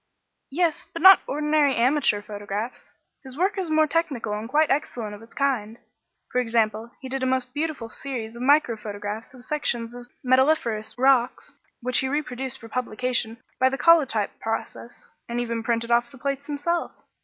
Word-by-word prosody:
"Yes. 330 +1 0
But 335 - -6
not 380 0 +10
ordinary 300 -1 +2
amateur 240 -4 +2
photographs; 205 +3 -6 0.3
his 265 0 -10
work 380 +4 +1
is 365 -3 -2
more 310 0 +4
technical 285 -9 -1
and 215 +2 -4
quite 300 +3 +3
excellent 240 -6 -2
of 205 - -10
its 225 - -16
kind. 235 -6 -1 0.5
For 250 - +2
example, 225 -1 0
he 265 - -8
did 265 +1 -3
a 260 - +1
most 255 -1 -1
beautiful 295 -5 -3
series 230 -2 -6
of 235 - -8
micro 285 -2 +4
photographs 210 +3 -6
of 245 - -11
sections 240 -6 -1
of 245 0 -10 0.2
metalliferous 255 -5 +2
rocks 260 -1 +2 0.3
which 250 +1 +2
he 265 - 0
reproduced 265 -3 -3
for 225 - -11
publication 240 -1 -1 0.2
by 260 0 +5
the 270 - -3
collotype 275 -12 +3
process, 225 +1 -5 0.2
and 235 +1 -2
even 230 -1 -2
printed 230 0 -1
off 240 0 +3
the 270 - -14
plates 280 +1 -3
himself." 320 +4 -2
250 Hz, 170 wpm, -25 LUFS, 230-285 Hz, 0.5 s, not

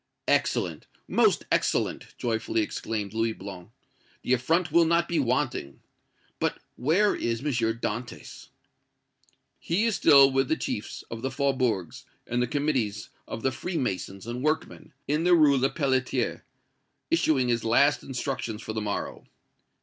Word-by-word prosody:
"Excellent - - 0 0.2
most - - +2
excellent!" - - 0
joyfully 115 -1 -1
exclaimed 105 -1 -3
Louis 115 0 0
Blanc. 95 -3 -9 0.5
"The 125 - +1
affront 160 +7 +1
will 170 +1 +5
not 170 +1 +2
be 170 -2 0
wanting! 125 - -1 0.6
But - - 0 0.2
where 175 +11 +2
is 115 0 -2
M. - - -9
Dantès?" 115 0 -3 1.1
"He 185 +7 0
is 230 -3 +1
still 140 -1 +7
with 135 0 +1
the 160 - +1
chiefs 105 - -4
of 115 -1 -5
the 135 - -1
faubourgs 130 - -1 0.2
and 120 +1 -1
the 125 - +1
committees 135 -6 -1 0.2
of 115 - -6
the 135 - +2
Free 175 +8 -4
masons 95 - -3
and 120 +2 -5
workmen, 155 +2 -2 0.2
in 150 +3 +1
the 175 0 +5
Rue 150 -4 +5
Lepelletier, 135 -1 0 0.7
issuing 150 - +2
his 115 -1 +1
last 140 +6 +3
instructions 125 -4 -4
for 110 - -5
the 110 - -2
morrow. 105 -1 -4
130 Hz, 140 wpm, -27 LUFS, 115-150 Hz, 1.1 s, still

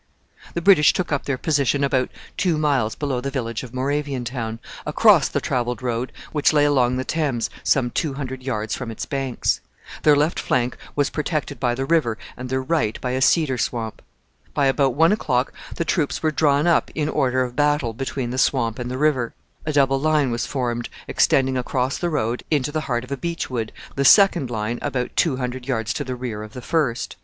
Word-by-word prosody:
The 170 - -2
British 180 -6 +6
took 180 -3 -2
up 140 - -1
their 140 -2 -1
position 140 -1 +1
about 130 -2 +1 0.3
two 175 -4 +1
miles 140 -8 +1
below 135 -4 -2
the 140 - -3
village 115 -5 -3
of 125 - -9
Moraviantown, 130 -4 -2 0.3
across - - +5
the - - 0
travelled 125 0 -2
road 120 0 -2 0.2
which 150 -2 +3
lay 145 -1 +4
along 130 -4 +2
the 130 - -2
Thames 145 -8 -1
some 125 -3 +2
two 145 0 -1
hundred 130 -2 -5
yards 110 -5 -2
from 125 -3 -4
its 115 - -5
banks. 135 -3 -1 0.4
Their 150 -1 +6
left 150 +4 +1
flank 125 0 0 0.2
was 145 -1 +1
protected 150 -3 -2
by 120 -1 +1
the 135 +2 -2
river 135 -8 +2 0.2
and 125 0 -7
their 130 0 -1
right 130 -7 0
by 125 - -2
a 130 +1 -1
cedar 135 -3 +3
swamp. 110 +1 -3 0.5
By 140 - +3
about 135 -1 +2
one 165 +4 +5
o'clock 130 - 0 0.2
the 170 - -2
troops 160 -4 0
were 155 - +2
drawn 145 -1 +2
up 170 -1 +3
in 150 -1 0
order 130 -4 +1
of 125 -1 -6
battle 145 -5 +1
between 130 0 -3
the 130 - -2
swamp 120 -4 +1
and 125 0 -4
the 130 - -3
river. 135 -5 +1 0.3
A - - +1
double 135 -2 +3
line 150 -3 +2
was 120 - -2
formed 120 -3 -2 0.2
extending 130 -1 +2
across 125 +1 -1
the 175 - 0
road 120 -6 -1
into 145 -2 +1
the 155 +1 -1
heart 120 -1 0
of 125 - -12
a 140 - -1
beech 170 0 -3
wood, 115 -3 -2 0.2
the 140 - +1
second 175 - +6
line 115 +1 -2
about 125 -1 -2
two 150 -7 +2
hundred 125 0 -4
yards 115 -5 -1
to 145 - -3
the 130 -2 -4
rear 120 -4 -5
of 110 0 -9
the 125 - -7
first. 145 -8 -1
130 Hz, 205 wpm, -22 LUFS, 125-145 Hz, 0.5 s, British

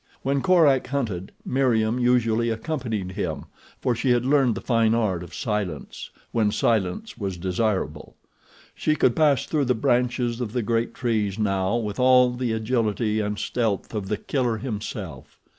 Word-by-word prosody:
When 140 +1 +1
Korak 150 -8 +4
hunted, 110 -10 -3
Meriem 120 -3 +1
usually 120 -2 +2
accompanied 115 - -3
him, - - -4 0.3
for 125 - +1
she 120 +3 -1
had 120 0 +3
learned 135 -4 +3
the - - -4
fine 115 -2 +2
art 100 -7 0
of 85 - -9
silence, 105 - -4 0.2
when 110 -3 +2
silence 115 - -1
was 95 -3 -3
desirable. 95 -3 -2 0.6
She 155 - 0
could 130 -5 +2
pass 145 -4 +3
through 150 -3 0
the 125 0 +2
branches 120 +1 0
of 115 -3 -4
the 125 -2 0
great 115 +2 -1
trees 110 -5 -1
now 100 -1 0
with 105 -2 -3
all 125 -1 +5
the 125 -1 -2
agility 110 -1 0
and 105 -1 -2
stealth 110 -4 -2
of 105 -3 -3
The 105 - -1
Killer 125 -5 -1
himself. 105 -3 -6
115 Hz, 160 wpm, -24 LUFS, 105-125 Hz, 0.6 s, all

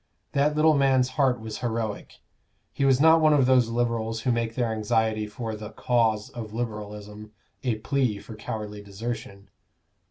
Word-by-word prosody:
That 145 +2 +2
little 155 +1 +5
man's 135 -3 +3
heart 130 -2 +1
was 110 -1 -6
heroic; 110 -3 -4 0.5
he 140 - 0
was 135 -1 +4
not 160 +2 +6
one 155 -1 +5
of 140 -3 +4
those 125 -2 +4
Liberals 115 -1 -1
who 125 - +1
make 115 -1 -1
their 120 -3 0
anxiety 110 0 0
for 110 0 -5
"the 105 0 -7
cause" 110 -4 0
of 110 -2 -7
Liberalism 105 -2 -6 0.3
a 125 -4 +1
plea 120 0 0
for 110 +2 -10
cowardly 105 -1 -6
desertion. 100 -1 -7
115 Hz, 160 wpm, -26 LUFS, 110-130 Hz, 0.5 s, not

